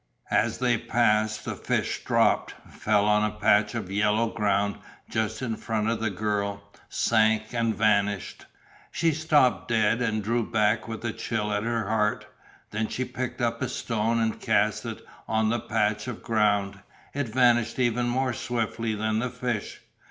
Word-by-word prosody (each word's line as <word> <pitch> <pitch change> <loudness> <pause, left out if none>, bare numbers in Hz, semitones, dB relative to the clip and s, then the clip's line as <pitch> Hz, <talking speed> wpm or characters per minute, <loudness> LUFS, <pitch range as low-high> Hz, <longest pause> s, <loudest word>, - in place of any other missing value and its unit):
As 110 +1 +2
they 120 -2 +1
passed 110 -2 +1
the - - -3
fish - - -2
dropped, - - +2 0.2
fell 105 -1 +1
on 105 0 +3
a 105 0 -1
patch 105 0 +3
of 100 -5 -4
yellow 105 +3 +2
ground 100 -2 0 0.3
just 110 +1 -1
in 115 -3 -2
front 110 -1 -2
of 115 - -2
the 110 - 0
girl, 100 0 -2 0.3
sank, 110 -1 +2
and 115 -2 0
vanished. 105 -3 0 0.4
She 165 -1 +1
stopped 150 -4 +2
dead 115 0 +2
and 110 -3 0
drew 115 +3 0
back 105 -1 +1
with 115 0 -6
a 115 - -1
chill 105 -2 -2
at 105 - 0
her 115 -2 -1
heart. 105 -1 0 0.5
Then 110 +1 -1
she 130 - -3
picked 130 +1 -5
up 115 -1 -1
a - - -1
stone 115 0 -1
and 110 -1 -1
cast - - +1
it - - -7 0.2
on 110 0 +1
the 120 +2 0
patch 105 0 -1
of 125 - -6
ground. 105 -3 +1 0.3
It 145 -4 -2
vanished 120 -1 +3
even 120 -1 +1
more 130 +1 0
swiftly 115 -2 -2
than 110 +1 0
the 125 +2 -1
fish. 125 -3 -4
110 Hz, 165 wpm, -26 LUFS, 105-120 Hz, 0.5 s, on